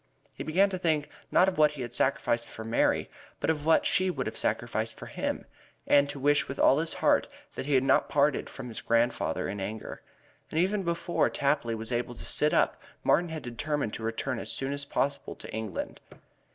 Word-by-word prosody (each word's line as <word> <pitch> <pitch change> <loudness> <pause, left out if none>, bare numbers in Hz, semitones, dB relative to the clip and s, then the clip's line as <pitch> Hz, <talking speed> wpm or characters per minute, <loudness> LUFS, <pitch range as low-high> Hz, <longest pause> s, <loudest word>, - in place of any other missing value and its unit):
He - - -6
began 195 +5 +3
to 185 - -3
think 155 -4 +1 0.2
not 185 - +5
of 185 -4 -1
what 150 -1 +7
he 135 -4 -5
had 120 0 -7
sacrificed 125 -3 +1
for 110 - -8
Mary, 115 +1 +1 0.3
but - - +2
of 150 -1 -4
what 165 - +5
she 185 0 +3
would 180 - -2
have - - -4
sacrificed - - -1
for - - -8
him, - - -3 0.4
and 140 0 +4
to 140 - -5
wish 145 +2 +3
with 135 - -5
all 135 - +5
his 165 +1 -1
heart - - +3 0.3
that 130 - -5
he 145 - +2
had 130 - +4
not - - +3
parted 145 -1 +2
from 135 -2 -8
his 115 - -5
grandfather 115 +1 +1
in 100 +1 -4
anger. 105 +3 -5 0.5
And 160 - -1
even 195 +4 +2
before 170 -1 0
Tapley 140 -5 0
was 110 +2 -5
able 120 0 -2
to - - -8
sit 150 +1 +1
up - - +2 0.2
Martin 175 0 +3
had 160 -1 -5
determined 125 0 -2
to - - -5
return 115 +3 -2
as - - -4
soon 135 +1 -1
as 140 0 -2
possible 140 0 -2
to - - -10
England. 110 -2 -4
140 Hz, 210 wpm, -29 LUFS, 120-155 Hz, 0.5 s, what